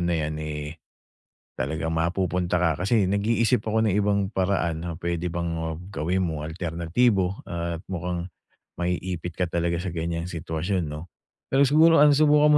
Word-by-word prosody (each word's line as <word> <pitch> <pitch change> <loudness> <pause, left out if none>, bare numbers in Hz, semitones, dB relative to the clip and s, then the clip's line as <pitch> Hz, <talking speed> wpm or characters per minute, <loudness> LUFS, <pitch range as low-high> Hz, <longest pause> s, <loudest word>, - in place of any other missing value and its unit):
na 85 -1 +1
'yan, 75 0 -2
eh, 75 +1 -5 0.8
talagang 80 +4 -2
mapupunta 90 +2 0
ka. 85 -3 +1
Kasi, 100 0 +2
nag-iisip 115 +4 +2
ako 110 +1 0
ng 105 -4 +2
ibang 100 0 +2
paraan 90 -4 0
na 85 - -4
puwede 85 +1 -2
bang, 85 0 -2
ah, 80 0 -3 0.2
gawin 90 +2 0
mo, 80 -3 -3
alternatibo, 90 +4 0
at 85 -1 -4
mukhang, 90 0 -3 0.4
maiipit 90 -1 -3
ka 90 - +2
talaga 85 0 -1
sa 90 -1 -4
ganiyang 85 0 -2
sitwasyon, 85 0 -2
'no. 75 +4 -7 0.5
Pero 135 +1 +5
siguro 160 +2 +6
ano, 150 - +7
subukan 150 0 +5
85 Hz, 155 wpm, -25 LUFS, 80-95 Hz, 0.8 s, ano